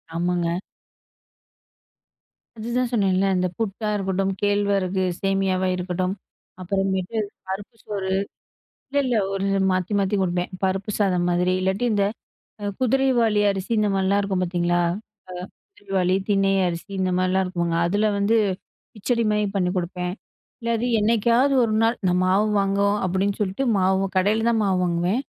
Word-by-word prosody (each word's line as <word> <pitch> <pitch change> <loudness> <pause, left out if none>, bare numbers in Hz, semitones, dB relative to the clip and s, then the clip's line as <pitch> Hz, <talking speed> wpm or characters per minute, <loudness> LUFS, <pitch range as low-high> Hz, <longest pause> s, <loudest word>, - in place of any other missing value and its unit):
ஆமாங்க. 175 0 0 2.0
அதுதான் 240 +2 -1
சொன்னேன்ல. 195 -3 +2
இந்த 180 0 +1
புட்டா 215 0 -2
இருக்கட்டும், 195 0 0
கேழ்வரகு 200 -2 +1 0.2
சேமியாவா 195 -1 +1
இருக்கட்டும், 180 +1 -2 0.5
அப்புறமேட்டு 195 +2 -1 0.3
பருப்பு 200 +4 -6
சோறு. 195 -2 -3 0.8
இல்ல, 280 - -10
இல்ல 245 -3 +1 0.2
ஒரு 195 0 -1 0.3
மாத்தி, 185 +2 -1
மாத்தி 195 +1 +1
குடுப்பேன். 175 -1 -1
பருப்பு 190 +2 0
சாதம் 180 -4 +1
மாதிரி, 180 +1 +2
இல்லாட்டி 190 +5 0
இந்த 200 -1 +2 0.6
அ - - -4
குதிரைவாலி 250 -4 +2
அரிசி 195 +3 -5
இந்த 210 - +2
மாதிரிலாம் 195 +1 +2
இருக்கும் 190 -2 -1
பார்த்தீங்களா! 175 0 +1 0.5
அ - - -7 0.5
குதிரைவாலி, 190 -2 0
தினை 195 -1 +3 0.2
அரிசி 170 +2 -5
இந்த 185 -1 +1
மாதிரிலாம் 185 +1 +2
இருக்குங்க. 170 -2 -1
அதில 205 +4 +1
வந்து 200 +3 +2 0.6
கிச்சடிமாரி 215 -1 +1
பண்ணிக் 180 -1 0
குடுப்பேன். 180 0 -3 0.5
இல்ல 235 0 -1
அது 245 +2 -1
என்னைக்காவது 235 +5 +3
ஒரு 220 -2 0
நாள் 230 +2 +2
நான் 180 +1 +2
மாவு 195 +3 +3
வாங்குவோம், 200 +1 +1
அப்பிடின்னு 190 +2 0
சொல்லிட்டு 200 +7 -1
மாவு 190 +1 +2
கடையில 215 +4 +2
தான் 225 -2 +2
மாவு 190 -2 +1
வாங்குவேன். 175 +8 0
195 Hz, 135 wpm, -23 LUFS, 185-210 Hz, 2.0 s, தினை